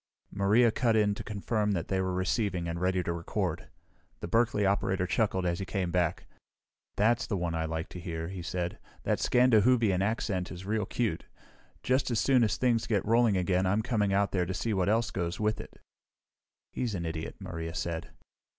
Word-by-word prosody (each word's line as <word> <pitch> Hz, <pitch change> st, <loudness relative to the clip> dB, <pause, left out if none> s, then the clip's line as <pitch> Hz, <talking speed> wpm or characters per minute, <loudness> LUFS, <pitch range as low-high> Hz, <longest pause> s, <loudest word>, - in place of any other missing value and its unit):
Maria 105 Hz, +4 st, +4 dB
cut 115 Hz, 0 st, +1 dB
in 105 Hz, -2 st, +3 dB
to -, -, -7 dB
confirm 105 Hz, 0 st, -1 dB
that 85 Hz, -3 st, -2 dB
they 95 Hz, -1 st, 0 dB
were 95 Hz, 0 st, -1 dB
receiving 95 Hz, -1 st, 0 dB
and 85 Hz, +1 st, -4 dB
ready 90 Hz, 0 st, +1 dB
to 85 Hz, -, -2 dB
record. 85 Hz, -1 st, -3 dB, 0.5 s
The -, -, -4 dB
Berkeley 115 Hz, -3 st, +2 dB
operator 95 Hz, -1 st, +1 dB
chuckled 95 Hz, -1 st, 0 dB
as 85 Hz, -1 st, 0 dB
he -, -, -2 dB
came 95 Hz, -4 st, -2 dB
back. 90 Hz, 0 st, 0 dB, 0.7 s
"That's 115 Hz, +4 st, +2 dB
the 100 Hz, -, -1 dB
one 85 Hz, -2 st, -2 dB
I 80 Hz, 0 st, -1 dB
like 80 Hz, 0 st, -3 dB
to 90 Hz, -, -8 dB
hear," 80 Hz, -1 st, -4 dB
he 95 Hz, 0 st, -6 dB
said. 90 Hz, 0 st, -3 dB, 0.2 s
"That -, -, 0 dB
'Scandahoovian' 115 Hz, -5 st, +4 dB
accent 100 Hz, -3 st, -1 dB
is 90 Hz, +1 st, -8 dB
real 105 Hz, 0 st, -1 dB
cute. 115 Hz, -10 st, -2 dB, 0.6 s
Just 130 Hz, +1 st, +1 dB
as 115 Hz, -3 st, +1 dB
soon 130 Hz, -3 st, +4 dB
as 110 Hz, -, +1 dB
things 120 Hz, -2 st, +1 dB
get 105 Hz, -3 st, 0 dB
rolling 115 Hz, -2 st, +3 dB
again 90 Hz, 0 st, +1 dB
I'm 105 Hz, +4 st, +1 dB
coming 105 Hz, -4 st, +1 dB
out 100 Hz, +1 st, +2 dB
there 90 Hz, -3 st, 0 dB
to 95 Hz, -, -3 dB
see 115 Hz, -, -1 dB
what 95 Hz, 0 st, +1 dB
else 115 Hz, +2 st, +1 dB
goes 85 Hz, -1 st, -3 dB
with 105 Hz, 0 st, 0 dB
it." -, -, -14 dB, 0.9 s
"He's 115 Hz, -5 st, -2 dB
an 85 Hz, -2 st, -3 dB
idiot," 80 Hz, -1 st, -4 dB
Maria 80 Hz, 0 st, -5 dB
said. 85 Hz, 0 st, -3 dB
100 Hz, 195 wpm, -29 LUFS, 90-110 Hz, 0.9 s, Maria